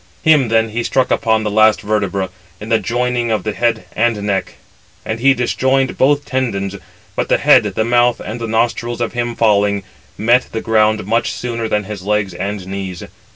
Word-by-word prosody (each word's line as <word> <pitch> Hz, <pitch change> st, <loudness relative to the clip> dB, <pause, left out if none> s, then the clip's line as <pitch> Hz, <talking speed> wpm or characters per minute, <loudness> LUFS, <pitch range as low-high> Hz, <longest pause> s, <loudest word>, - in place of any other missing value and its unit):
Him 150 Hz, -5 st, +4 dB
then 115 Hz, 0 st, +2 dB
he 115 Hz, +2 st, -2 dB
struck 130 Hz, +2 st, 0 dB
upon 110 Hz, -1 st, +1 dB
the 105 Hz, -, -2 dB
last 110 Hz, 0 st, +4 dB
vertebra, 100 Hz, -3 st, -1 dB, 0.3 s
in 105 Hz, -, -8 dB
the 115 Hz, -, +3 dB
joining 120 Hz, 0 st, -1 dB
of 110 Hz, -1 st, 0 dB
the 110 Hz, -, -2 dB
head 115 Hz, -1 st, 0 dB
and 115 Hz, -1 st, +1 dB
neck, 100 Hz, -2 st, -2 dB, 0.5 s
and 110 Hz, +1 st, -3 dB
he 135 Hz, +2 st, +4 dB
disjoined 130 Hz, +2 st, 0 dB
both 145 Hz, +2 st, +2 dB
tendons; 100 Hz, -7 st, -2 dB, 0.4 s
but -, -, -2 dB
the -, -, +4 dB
head, -, -, +5 dB
the 110 Hz, -, -1 dB
mouth, 120 Hz, 0 st, +3 dB
and 115 Hz, +3 st, -6 dB
the 115 Hz, -, -3 dB
nostrils 115 Hz, +1 st, -1 dB
of 120 Hz, -, -2 dB
him 120 Hz, -1 st, -2 dB
falling, 100 Hz, -2 st, +2 dB, 0.3 s
met 120 Hz, +4 st, +3 dB
the 110 Hz, -, -2 dB
ground 110 Hz, -2 st, +2 dB
much 115 Hz, +3 st, 0 dB
sooner 115 Hz, -2 st, -4 dB
than 105 Hz, -1 st, 0 dB
his 100 Hz, -1 st, -7 dB
legs 105 Hz, -1 st, -1 dB
and 100 Hz, +1 st, -4 dB
knees. 95 Hz, -2 st, -6 dB
110 Hz, 190 wpm, -17 LUFS, 105-120 Hz, 0.5 s, head